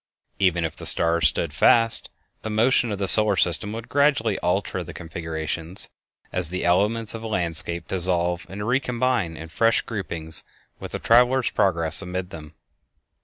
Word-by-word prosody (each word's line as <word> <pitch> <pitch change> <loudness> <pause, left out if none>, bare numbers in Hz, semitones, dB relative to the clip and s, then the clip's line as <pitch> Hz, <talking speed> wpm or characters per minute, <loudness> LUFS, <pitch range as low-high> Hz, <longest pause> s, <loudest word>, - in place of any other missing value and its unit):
Even 90 -4 +2
if 80 - -5
the - - -3
stars 85 0 +2
stood 80 -4 -2
fast, 115 +8 +3 0.3
the 110 - -5
motion 115 +2 +2
of 100 - -3
the 100 0 -2
solar 105 0 +5
system 90 +3 +3
would 115 +1 -7
gradually 140 -7 +1
alter 90 0 -1
the 80 - -11
configurations, 80 +1 -2 0.4
as 90 -3 +3
the 90 +1 -3
elements 105 +5 +1
of 115 - -7
a 115 - -6
landscape 85 -3 -2
dissolve 90 -1 0
and 105 +2 -6
recombine 125 - 0
in 80 - -8
fresh 115 +7 +2
groupings 85 -7 -5 0.4
with - - -9
the - - -2
traveler's 125 +2 +3
progress 85 -4 +1
amid 90 0 -5
them. 75 -2 -11
95 Hz, 160 wpm, -23 LUFS, 85-115 Hz, 0.4 s, solar